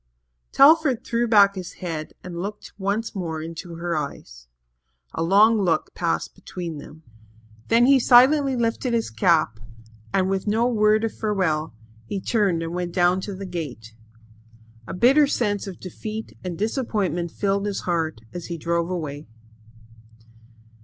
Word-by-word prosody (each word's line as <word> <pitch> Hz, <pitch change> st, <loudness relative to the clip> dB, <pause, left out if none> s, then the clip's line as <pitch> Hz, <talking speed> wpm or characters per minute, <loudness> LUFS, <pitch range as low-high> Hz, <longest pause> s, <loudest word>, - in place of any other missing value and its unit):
Telford 295 Hz, -4 st, +5 dB
threw 235 Hz, 0 st, 0 dB
back 200 Hz, -3 st, +6 dB
his 185 Hz, -3 st, -7 dB
head 160 Hz, -4 st, -6 dB
and 175 Hz, -1 st, -6 dB
looked 210 Hz, +2 st, -7 dB
once 200 Hz, +3 st, -2 dB
more 165 Hz, -5 st, -4 dB
into 165 Hz, +2 st, -7 dB
her 170 Hz, 0 st, -3 dB
eyes. 60 Hz, -, -6 dB, 0.7 s
A -, -, -3 dB
long 205 Hz, +6 st, +5 dB
look 165 Hz, -5 st, 0 dB
passed 170 Hz, -2 st, -2 dB
between 175 Hz, -4 st, -7 dB
them. 155 Hz, +2 st, -13 dB, 0.6 s
Then 235 Hz, +1 st, +4 dB
he 275 Hz, +1 st, +6 dB
silently 265 Hz, +3 st, +5 dB
lifted 235 Hz, +1 st, -1 dB
his 230 Hz, -, -1 dB
cap 160 Hz, -, +2 dB, 0.5 s
and, 190 Hz, -1 st, +1 dB
with 195 Hz, +1 st, -2 dB
no 220 Hz, +3 st, +2 dB
word 215 Hz, -2 st, +3 dB
of 225 Hz, -, -2 dB
farewell, 165 Hz, -, -1 dB, 0.3 s
he 200 Hz, -, -3 dB
turned 190 Hz, -6 st, 0 dB
and 165 Hz, +1 st, -5 dB
went 175 Hz, -1 st, -3 dB
down 180 Hz, +1 st, +2 dB
to 200 Hz, 0 st, -6 dB
the 195 Hz, +1 st, -7 dB
gate. 140 Hz, -, -6 dB, 0.9 s
A -, -, -5 dB
bitter 270 Hz, +9 st, +5 dB
sense 205 Hz, -7 st, -1 dB
of 190 Hz, -, -8 dB
defeat 215 Hz, +4 st, -7 dB
and 180 Hz, -2 st, -5 dB
disappointment 205 Hz, -, -1 dB
filled 200 Hz, +4 st, -1 dB
his 200 Hz, -, -3 dB
heart 165 Hz, -8 st, -2 dB
as 175 Hz, -1 st, -6 dB
he 170 Hz, -, -5 dB
drove 170 Hz, +1 st, -1 dB
away. 155 Hz, -5 st, -5 dB
190 Hz, 150 wpm, -23 LUFS, 170-220 Hz, 0.9 s, back